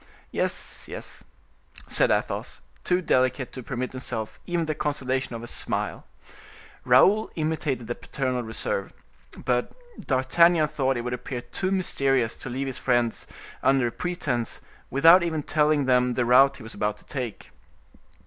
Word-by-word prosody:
"Yes, -, -, -3 dB
yes," -, -, -8 dB, 0.6 s
said -, -, +2 dB
Athos, -, -, -1 dB, 0.2 s
too 180 Hz, 0 st, +1 dB
delicate 130 Hz, -3 st, +1 dB
to 130 Hz, -, -6 dB
permit 125 Hz, 0 st, -4 dB
himself 110 Hz, -4 st, -5 dB
even 175 Hz, -2 st, 0 dB
the 155 Hz, -, -1 dB
consolation 130 Hz, -4 st, -2 dB
of 115 Hz, -, -7 dB
a -, -, -7 dB
smile. -, -, -3 dB, 0.8 s
Raoul 215 Hz, +3 st, +5 dB
imitated 155 Hz, -6 st, -1 dB
the 120 Hz, -, -2 dB
paternal 130 Hz, -1 st, -3 dB
reserve. 110 Hz, -3 st, -3 dB, 0.5 s
But 125 Hz, -1 st, 0 dB, 0.3 s
D'Artagnan 155 Hz, +5 st, +3 dB
thought 135 Hz, -2 st, 0 dB
it -, -, -2 dB
would 125 Hz, +1 st, -3 dB
appear 125 Hz, 0 st, -5 dB
too 120 Hz, +10 st, -3 dB
mysterious 135 Hz, -10 st, +1 dB
to -, -, -7 dB
leave 130 Hz, +3 st, -2 dB
his 130 Hz, -2 st, -5 dB
friends 120 Hz, -2 st, 0 dB, 0.3 s
under 135 Hz, -2 st, +3 dB
a 120 Hz, -, -1 dB
pretense, 175 Hz, -10 st, -2 dB, 0.3 s
without 165 Hz, +7 st, +7 dB
even 160 Hz, -3 st, -1 dB
telling 150 Hz, -1 st, +2 dB
them 125 Hz, -1 st, +3 dB
the 125 Hz, -, +1 dB
route 135 Hz, +3 st, +6 dB
he -, -, -11 dB
was 110 Hz, -, -7 dB
about 105 Hz, 0 st, -1 dB
to -, -, -20 dB
take. 125 Hz, -6 st, -5 dB
130 Hz, 150 wpm, -26 LUFS, 120-150 Hz, 0.8 s, without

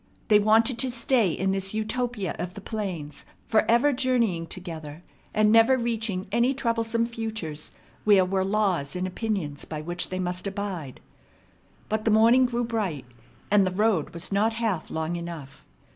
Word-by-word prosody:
They 210 Hz, -1 st, +7 dB
wanted 225 Hz, +3 st, +3 dB
to 260 Hz, -, +1 dB
stay 240 Hz, -3 st, +2 dB
in 190 Hz, +4 st, 0 dB
this 195 Hz, +1 st, -2 dB
Utopia 220 Hz, -3 st, -2 dB
of 180 Hz, +1 st, -4 dB
the -, -, -6 dB
plains, 190 Hz, -9 st, -5 dB, 0.2 s
forever 235 Hz, +5 st, +3 dB
journeying 235 Hz, -10 st, +1 dB
together, 165 Hz, -3 st, -8 dB, 0.3 s
and 215 Hz, 0 st, +3 dB
never 230 Hz, +4 st, +6 dB
reaching 220 Hz, -5 st, -2 dB
any 240 Hz, +4 st, +2 dB
troublesome 230 Hz, -2 st, 0 dB
futures 220 Hz, -10 st, -5 dB, 0.3 s
where 200 Hz, -3 st, +5 dB
were 190 Hz, +1 st, 0 dB
laws 190 Hz, -8 st, 0 dB
and 180 Hz, 0 st, -2 dB
opinions 185 Hz, -7 st, -3 dB
by 155 Hz, -1 st, -6 dB
which 175 Hz, +3 st, -3 dB
they 185 Hz, -, -3 dB
must 180 Hz, +1 st, -2 dB
abide. 195 Hz, -9 st, -5 dB, 0.9 s
But 215 Hz, 0 st, -2 dB
the -, -, +3 dB
morning 230 Hz, +4 st, +5 dB
grew 240 Hz, 0 st, -1 dB
bright, 205 Hz, -, -2 dB, 0.5 s
and 205 Hz, -1 st, +6 dB
the 185 Hz, -, +1 dB
road 190 Hz, -3 st, +1 dB
was 170 Hz, +3 st, -4 dB
not 210 Hz, +3 st, +2 dB
half 225 Hz, -8 st, -2 dB
long 160 Hz, +2 st, -2 dB
enough. 165 Hz, -5 st, -8 dB
205 Hz, 160 wpm, -26 LUFS, 175-230 Hz, 0.9 s, They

